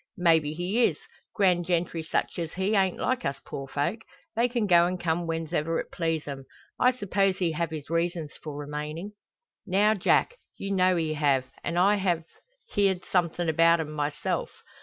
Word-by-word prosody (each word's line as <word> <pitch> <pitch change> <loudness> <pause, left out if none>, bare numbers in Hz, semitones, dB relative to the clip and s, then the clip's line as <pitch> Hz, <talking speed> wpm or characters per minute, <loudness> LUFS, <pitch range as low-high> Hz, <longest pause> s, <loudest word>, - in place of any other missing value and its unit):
"Maybe 165 -4 +3
he 185 +8 +1
is. - - 0 0.4
Grand 180 -4 +3
gentry 170 -1 0
such 160 - -2
as 165 -2 -4
he 190 +3 0
ain't 190 -2 +2
like 255 0 -1
us 140 - -2
poor 135 0 -6
folk. 155 - -1 0.4
They 235 +2 +2
can 240 -3 0
go 175 -3 +5
and 180 0 -3
come 170 0 -1
whens'ever 165 0 -1
it - - -6
please 165 -3 -2
'em. 135 -2 -6 0.3
I 250 - +5
suppose 195 -5 0
he 175 -3 +1
have 165 +1 -1
his 155 -3 -6
reasons 165 -2 -1
for 150 -2 -6
remaining." 150 +6 -5 0.6
"Now, 205 +3 +4
Jack, 220 - +2 0.2
you 195 - -4
know 185 -1 +3
he 160 -2 0
have, 140 -4 +2 0.2
an' 170 0 -2
I've 185 -3 +3 0.5
heerd 195 -3 +1
something 175 -1 0
about 165 +1 +4
'em 155 -1 -3
myself." 145 -1 -2
170 Hz, 175 wpm, -27 LUFS, 155-190 Hz, 0.6 s, go